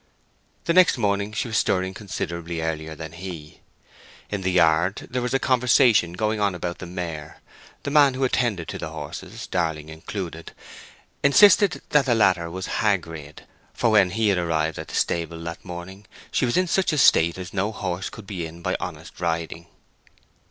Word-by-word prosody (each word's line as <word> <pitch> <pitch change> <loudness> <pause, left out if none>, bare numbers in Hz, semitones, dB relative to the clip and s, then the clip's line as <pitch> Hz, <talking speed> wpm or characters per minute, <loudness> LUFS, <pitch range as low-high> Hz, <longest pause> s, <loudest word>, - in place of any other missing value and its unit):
The 170 - +2
next 185 -4 +5
morning 100 -2 0
she 110 +3 -2
was 110 -1 +1
stirring 95 0 0
considerably 85 -4 -5
earlier 80 -1 -3
than 80 0 -7
he. 85 -3 -9 0.7
In 100 -2 -2
the 95 0 0
yard 85 +2 +2
there 125 0 -1
was 125 +1 -1
a - - +6
conversation 120 -8 +3
going 110 +3 -1
on 100 -3 +1
about 90 0 -4
the 90 - -7
mare; 85 -4 -6 0.4
the 140 - -3
man 145 -3 +5
who 135 - -1
attended 120 -9 0
to - - -5
the - - -4
horses, - - -7
Darling 80 -2 -2
included, 85 +1 -7 0.7
insisted 200 +6 +5
that 145 -2 +3
the 120 - +3
latter 90 -6 +3
was 95 +3 -5 0.2
"hag 100 -5 +2
rid;" 75 -3 -10 0.3
for 115 - +2
when 100 -4 +5
he 110 +3 +1
had 95 -3 +2
arrived 80 -2 -1
at - - -6
the - - -7
stable 85 0 -1
that 85 0 -6
morning 95 +3 -9 0.2
she - - +1
was 120 - 0
in 185 - +3
such 185 +1 +1
a 155 - -1
state 85 - +5
as 90 -2 -7
no 100 +2 0
horse 95 -3 -3
could 110 - -11
be 90 -5 -4
in 85 +2 -13
by - - 0
honest - - -7
riding. 85 0 -2
95 Hz, 185 wpm, -24 LUFS, 85-110 Hz, 0.7 s, a